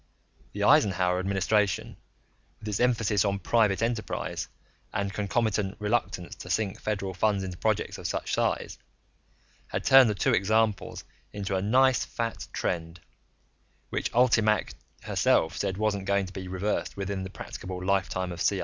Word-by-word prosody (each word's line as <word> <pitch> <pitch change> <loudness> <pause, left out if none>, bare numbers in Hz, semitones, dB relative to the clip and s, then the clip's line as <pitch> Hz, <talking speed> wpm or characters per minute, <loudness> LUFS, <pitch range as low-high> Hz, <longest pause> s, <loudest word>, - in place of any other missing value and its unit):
The - - -2
Eisenhower 90 -2 +4
administration, 100 +3 0 0.6
with 110 - -10
its 105 - -1
emphasis 115 -5 +2
on 100 -1 0
private 105 0 +2
enterprise 115 -2 -2 0.4
and 100 0 -2
concomitant 105 -1 0
reluctance 105 -4 -1
to - - -9
sink 105 -1 -1
federal 100 -3 -2
funds 100 +1 +1
into 95 -2 -6
projects - - -1
of - - -3
such - - -3
size, - - -1 0.9
had - - -3
turned 135 -3 +7
the 105 - 0
two - - +1
examples 110 +1 +1 0.3
into 100 -1 -3
a 95 - 0
nice 125 +3 +4
fat 115 -1 -4
trend, 85 -1 -3 0.9
which - - -2
ULTIMAC 110 -4 +3 0.3
herself 80 +2 +2
said 95 -2 -2
wasn't 105 -2 0
going 100 0 +1
to 95 - -10
be 95 -1 -6
reversed 95 +4 -2
within 100 -1 -3
the 95 - -5
practicable 90 -1 -7
lifetime 95 -1 0
of 85 -1 -6
CIA. 100 - +2
100 Hz, 150 wpm, -27 LUFS, 95-110 Hz, 0.9 s, turned